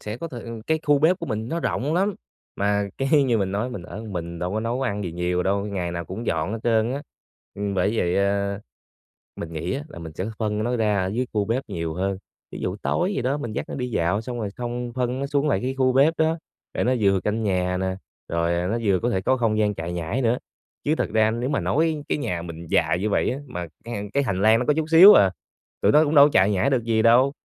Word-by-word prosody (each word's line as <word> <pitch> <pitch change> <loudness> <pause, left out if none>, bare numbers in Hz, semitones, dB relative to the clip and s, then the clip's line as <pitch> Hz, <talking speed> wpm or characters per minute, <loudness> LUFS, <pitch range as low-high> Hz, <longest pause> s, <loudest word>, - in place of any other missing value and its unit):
sẽ 105 +1 -5
có 165 +6 -6
thời 120 -6 -8
ừ, 115 -1 -7
cái 160 0 +1
khu 145 -1 +3
bếp 165 +5 +3
của - - -5
mình 110 -1 -3
nó 170 +1 -2
rộng 145 +2 -1
lắm, 195 +3 +1 0.4
mà 100 0 0
cái 140 +2 +3
như 120 -3 +2
mình 95 -2 -1
nói 105 +5 -1
mình 120 -8 -6
ở - - -10
một 105 -1 -7
mình 85 -1 -5
đâu 90 +2 -3
có 110 - -1
nấu 120 +3 -2
ăn 105 -5 -2
gì 85 - -4
nhiều 90 +1 -1
đâu, 100 +1 0
ngày 95 -4 -3
nào 85 0 -4
cũng 100 +8 -7
dọn 80 +4 -1
hết 115 - -3
trơn 115 0 +2
á. 140 +2 -4 0.5
Ừm, 100 0 -3
bởi 100 +5 +1
vậy, 90 -3 +1
à, 100 0 0 0.8
mình 85 0 -7
nghĩ 85 +7 -3
á, 140 - -3
là 115 - -10
mình 80 -1 -8
sẽ 90 - -4
phân 105 -1 -1
nó 120 +2 0
ra 105 -3 +1
ở - - -1
dưới 120 +7 -1
khu 105 -1 +1
bếp 120 +6 -1
nhiều 85 -6 -3
hơn, 95 +3 -2 0.3
ví - - -7
dụ 90 - -2
tối 180 +3 0
gì 130 - -1
đó 135 +4 0
mình 120 -6 -5
dắt - - -3
nó - - -4
đi 125 -1 -3
dạo 100 -1 0
xong 120 +1 -5
rồi 105 -3 -2
xong 120 0 -4
phân 125 0 -1
nó 140 - -1
xuống 145 +1 0
lại - - +2
cái 130 +1 -2
khu 130 -1 +3
bếp 140 +5 +5
đó, 160 +1 +2 0.4
để - - 0
nó 125 - +2
vừa 100 -2 +3
canh 110 +2 -1
nhà 90 -2 0
nè, 95 0 -2 0.3
rồi, 85 +1 0
à, 90 +1 -1
nó 110 +5 0
vừa 95 -3 +2
có 120 - 0
thể 95 -5 0
có 130 +6 +2
không 115 -3 +1
gian 105 -1 +2
chạy 85 +1 -5
nhảy 90 +10 -2
nữa. 120 +1 +2 0.5
Chứ 150 - +1
thật - - -1
ra 110 0 +3
nếu 120 +4 -2
mà 145 - 0
nói 155 -1 0
cái - - +1
nhà 90 - -3
mình 85 0 -8
dài 90 - +2
như 105 +2 -1
vậy - - +1
á, 130 - -3
mà 90 -8 -5 0.2
chẳng 120 +1 -5
hạn 100 0 -5
cái 140 0 +1
hành 100 -6 -1
lang 110 +2 +5
nó 125 - -1
có 150 - +3
chút 160 0 -1
xíu 185 +6 +10
à, 95 - +5 0.5
tụi - - +4
nó 150 +1 +6
cũng 155 0 0
đâu 140 -1 +9
có - - +3
chạy 95 +3 +4
nhảy 100 +5 +2
được 130 -4 +1
gì 115 -1 +1
đâu, 125 +5 +5
110 Hz, 275 wpm, -24 LUFS, 95-130 Hz, 0.8 s, xíu